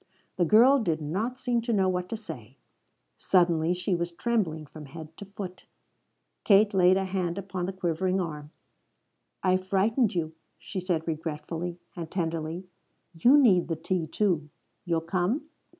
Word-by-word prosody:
The 175 - +2
girl 245 - +6
did 165 -9 0
not 200 +12 -2
seem 240 -2 0
to 235 +1 -2
know 195 -3 +3
what 180 -1 -1
to 225 - -3
say. 135 - -10 0.6
Suddenly 175 -2 +3
she 180 +2 -1
was 170 0 -1
trembling 170 -6 -1
from 150 +1 -11
head 160 +2 -10
to 200 - -8
foot. 195 -2 -8 0.8
Kate 205 0 +5
laid 185 0 +5
a 195 - 0
hand 185 -2 -2
upon 190 -2 -4
the - - -2
quivering 185 0 -1
arm. 150 -4 -4 0.9
"I've 185 0 +1
frightened 210 +3 +2
you," 160 -2 -2 0.2
she 195 - -6
said 175 -3 -1
regretfully 160 +2 -4 0.2
and 165 -2 -6
tenderly. 165 0 -3 0.5
"You 240 - +5
need 200 -11 +5
the 165 - -1
tea, 165 +1 -2
too. 165 -4 0 0.4
You'll 165 -2 0
come?" 185 - -1
180 Hz, 155 wpm, -28 LUFS, 165-195 Hz, 0.9 s, girl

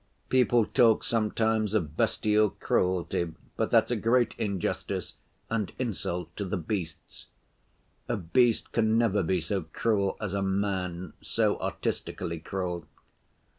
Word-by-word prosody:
People 120 -3 +4
talk 115 0 +4
sometimes 110 -1 +1
of 80 -8 -1
bestial 105 0 +2
cruelty, 90 -3 0 0.2
but - - 0
that's - - +4
a - - +2
great 120 +1 +2
injustice 100 -4 -2 0.3
and 110 -4 -1
insult 95 -7 -3
to 100 - -2
the 100 +1 -2
beasts; 85 -2 -5 0.8
a - - +1
beast 115 +6 +2
can 110 -1 +2
never 110 -4 +3
be 90 +1 +1
so 95 +4 -2
cruel 100 +4 0
as 105 -3 -3
a 100 - 0
man, 95 -3 -1
so - - +1
artistically 85 -2 -3
cruel. 90 -2 -4
100 Hz, 130 wpm, -28 LUFS, 90-110 Hz, 0.8 s, People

